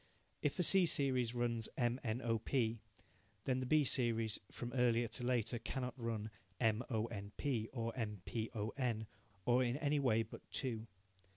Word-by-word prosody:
If 145 - 0
the 180 - +3
C 185 +1 +6
series 130 -5 +1
runs 115 -2 0
M, 120 0 +1
N, 120 +1 -1
O, 115 -1 +1
P, 115 -1 0 0.7
then 130 -1 +1
the 130 - -2
B 155 +2 +5
series 115 -4 +3
from 120 0 -6
earlier 120 -2 +3
to 120 +2 -3
later 120 -1 +1
cannot 125 0 -3
run 115 -3 -3 0.3
M, 110 0 +2
O, 110 -3 +1
N, 100 -3 -6
P, 120 -6 -1
or 115 -2 -3
M, 105 -6 -3
P, 110 -1 -2
O, 105 0 -1
N, 115 -5 0 0.4
or 125 +1 +4
in 125 +2 0
any 145 -1 +1
way 115 -5 +3
but 110 - -10
two. 115 -4 -2
120 Hz, 180 wpm, -38 LUFS, 110-130 Hz, 0.7 s, C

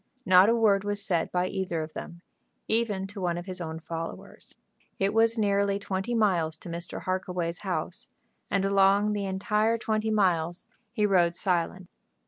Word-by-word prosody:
Not 185 +2 +7
a 230 - +4
word 205 -4 +3
was 205 0 -2
said 180 -4 -1
by 180 0 +1
either 185 -4 -2
of 155 - -9
them, 170 0 -8 0.5
even 220 -4 0
to 200 0 -8
one 175 -1 0
of 175 - -6
his 185 -1 -5
own 160 -1 -5
followers. 165 0 -8 0.4
It 195 +1 +1
was 225 +1 +3
nearly 200 -1 +2
twenty 200 +3 -3
miles 175 -8 +1
to 175 - -10
Mr. 170 +1 -4
Harkaway's 180 -2 -2
house, - - -3 0.4
and 195 -1 +1
along 200 +1 +3
the 205 -1 -2
entire 210 +4 +1
twenty 220 -1 -1
miles 175 -5 +1 0.3
he 215 -3 +1
rode 175 -4 +3
silent. 180 0 -1
190 Hz, 165 wpm, -27 LUFS, 175-210 Hz, 0.5 s, Not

